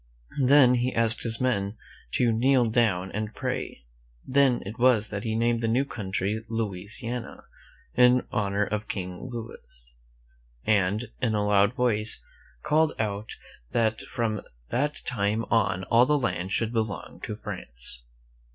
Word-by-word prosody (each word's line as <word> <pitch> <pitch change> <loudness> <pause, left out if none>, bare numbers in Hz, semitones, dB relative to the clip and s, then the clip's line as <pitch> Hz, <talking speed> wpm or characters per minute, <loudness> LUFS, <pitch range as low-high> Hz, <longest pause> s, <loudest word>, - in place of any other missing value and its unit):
Then 130 -1 +6
^^ - - +2
he 125 +1 0
asked 115 -1 +5
all 115 - -2
his 115 - +3
men 110 -5 0 0.4
to 120 -2 +3
kneel 125 +2 +3
down 110 -5 +1
and 110 +1 -4
pray. 125 - -4 0.4
1^ - - -8
Then 135 -3 +4
it 110 +5 -7
was 120 -4 +4
that 100 -1 -4
he 110 -1 -1
named 115 0 +1
the 115 - 0
new 125 +5 +2
country 105 -2 -3
Louisiana, 115 +3 -4 0.5
in 125 0 +5
honor 100 0 0
of 105 +1 -3
King 90 +4 -5
Louis, - - -10 0.7
and, 105 +2 +1
in 115 -4 +1
a 105 -1 +1
loud 105 +2 +3
voice, 110 -4 +1 0.4
called 155 +1 +2
out 105 -1 -3 0.4
that 110 -2 +1
from 110 -3 -2 0.3
that 145 +4 -1
time 110 -1 0
on 100 -5 +2
all 120 +5 +4
the 150 - +3
land 100 -8 -2
should 115 +3 0
belong 110 -7 -3
to 105 - -5
France. 65 - -6
110 Hz, 150 wpm, -26 LUFS, 100-125 Hz, 0.7 s, Then